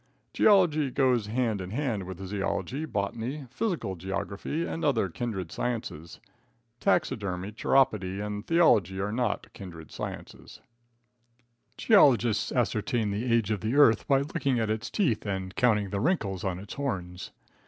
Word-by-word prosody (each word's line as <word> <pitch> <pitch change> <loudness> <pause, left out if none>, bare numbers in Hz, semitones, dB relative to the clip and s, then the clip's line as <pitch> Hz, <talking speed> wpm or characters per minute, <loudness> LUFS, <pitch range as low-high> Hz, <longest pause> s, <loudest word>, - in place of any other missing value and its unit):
Geology 170 -9 +4
goes 125 -5 +2
hand 110 -2 0
in 90 - -6
hand 110 -5 -2
with 95 +1 -7
zoology, 100 - -2
botany, 120 +5 -3
physical 165 - -2
geography 100 - -3
and 165 - -4
other 115 -10 +2
kindred 95 -3 -4
sciences. 95 -10 -4 0.6
Taxidermy, 105 - 0
chiropody 105 -5 +1
and 105 0 -5
theology 105 - +3
are 100 +2 -1
not 115 -3 -2
kindred 85 -5 -10
sciences. - - -8 1.2
Geologists 125 - +4
ascertain 115 -3 0
the 115 +5 -2
age 115 -3 +2
of 105 -4 -1
the 110 +6 -1
earth 115 -7 +5
by 135 -1 +4
looking 140 -3 -1
at 110 -1 0
its 110 +2 -3
teeth 140 - 0
and 95 -2 -4
counting 105 -6 +2
the 100 - -1
wrinkles 105 - 0
on 95 -2 -2
its 100 +3 -8
horns. 90 -11 -4
110 Hz, 140 wpm, -28 LUFS, 95-135 Hz, 1.2 s, earth